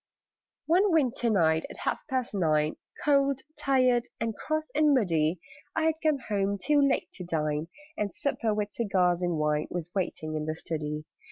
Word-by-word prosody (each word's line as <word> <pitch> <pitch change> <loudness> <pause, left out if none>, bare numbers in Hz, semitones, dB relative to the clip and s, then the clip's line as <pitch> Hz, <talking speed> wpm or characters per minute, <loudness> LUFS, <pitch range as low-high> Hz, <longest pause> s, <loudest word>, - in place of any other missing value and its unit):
One 370 +5 +4
winter 255 -7 +2
night, 160 -6 +2
at - - -10
half - - -2
past 255 -3 -1
nine, 155 -5 +1 0.3
Cold, 275 -2 +3
tired, 255 -3 +2
and 225 -1 -2
cross, 310 0 -3
and 300 -1 +4
muddy, 165 -7 +1 0.4
I 320 - +1
had 320 0 +3
come 310 -2 +2
home, 200 -1 0
too 295 +7 +3
late 275 -1 +1
to 185 - -7
dine, 155 -2 -1 0.3
And 205 -1 -1
supper, 235 -5 -1
with 210 -1 -1
cigars 185 -6 +1
and 175 -2 0
wine, 150 0 0
Was 175 -1 -5
waiting 160 -5 -2
in 155 -1 -2
the 155 0 -2
study. 150 -2 -4
200 Hz, 170 wpm, -28 LUFS, -, 0.4 s, One